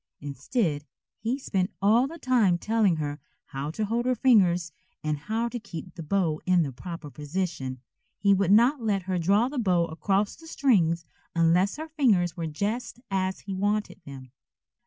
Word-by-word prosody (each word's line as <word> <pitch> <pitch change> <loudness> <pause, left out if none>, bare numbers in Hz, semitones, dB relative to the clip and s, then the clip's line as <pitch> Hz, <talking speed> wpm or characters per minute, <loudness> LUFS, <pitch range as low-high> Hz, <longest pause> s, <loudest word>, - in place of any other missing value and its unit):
Instead, 145 - -2 0.3
he 235 +5 -1
spent 190 -8 -1
all 225 +6 +4
the 330 +4 -9
time 235 - +3
telling 215 -2 +2
her 145 -1 -3 0.3
how 140 +1 -5
to 210 +7 -2
hold 235 +4 -1
her 255 - +2
fingers 180 -9 +3 0.3
and 155 -1 0
how 220 +10 -2
to 240 +1 -5
keep 185 -4 -8
the - - -8
bow 160 -1 0
in 180 -2 +4
the 140 - -3
proper 165 +2 -8
position. 150 -4 -4 0.4
He 200 -1 +4
would 195 -2 +2
not 240 +6 +5
let 205 -4 0
her 185 0 -1
draw 200 +8 +3
the 270 0 -3
bow 180 -6 +2
across 195 +5 0
the 325 - -15
strings 175 - +2 0.3
unless 170 +4 +3
her 315 +1 -6
fingers 215 - +2
were 165 -2 -3
just 220 +10 -3
as 190 -1 -1
he 195 - -6
wanted 205 +2 -1
them. 135 -4 -10
190 Hz, 175 wpm, -27 LUFS, 165-225 Hz, 0.4 s, not